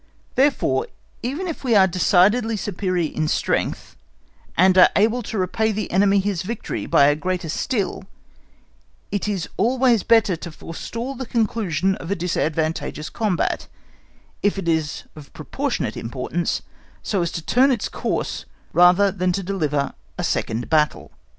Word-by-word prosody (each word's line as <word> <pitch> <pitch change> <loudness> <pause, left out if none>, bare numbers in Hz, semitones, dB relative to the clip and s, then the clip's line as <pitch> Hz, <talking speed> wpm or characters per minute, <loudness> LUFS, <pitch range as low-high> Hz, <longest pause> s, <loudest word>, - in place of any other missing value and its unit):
Therefore, 260 - +2 0.3
even 290 +10 -3
if 330 - -5
we 240 -4 +2
are 195 -2 +7
decidedly 200 +5 +3
superior 185 -5 -2
in 155 0 -1
strength, - - -1 0.6
and 185 +1 +5
are 185 - +8
able 225 +4 +3
to 220 - -5
repay 220 +4 0
the 210 -2 -3
enemy 195 +2 +4
his 195 -3 0
victory 220 +4 -4
by 140 - +5
a 145 +1 +4
greater 180 +1 -3
still, 200 - -2 1.1
it 205 0 -2
is 195 -5 -2
always 245 +1 +3
better 225 -5 +3
to 170 +1 -8
forestall 230 - -6
the 260 -1 -6
conclusion 205 -6 0
of 165 - -8
a 200 - +1
disadvantageous 160 -3 -2
combat, 210 -6 -1 0.7
if 205 0 +1
it 190 -3 -4
is 160 -2 0
of 150 -2 -12
proportionate - - -3
importance, 130 +8 -3 0.4
so 195 -4 0
as 170 - -1
to 165 - -4
turn 255 +10 +4
its 245 -6 0
course - - -3 0.3
rather 180 +3 +5
than 185 -1 0
to 195 +2 -2
deliver 155 -7 -1 0.2
a - - -3
second 115 +2 -1
battle. 150 -1 +1
190 Hz, 150 wpm, -22 LUFS, 165-220 Hz, 1.1 s, are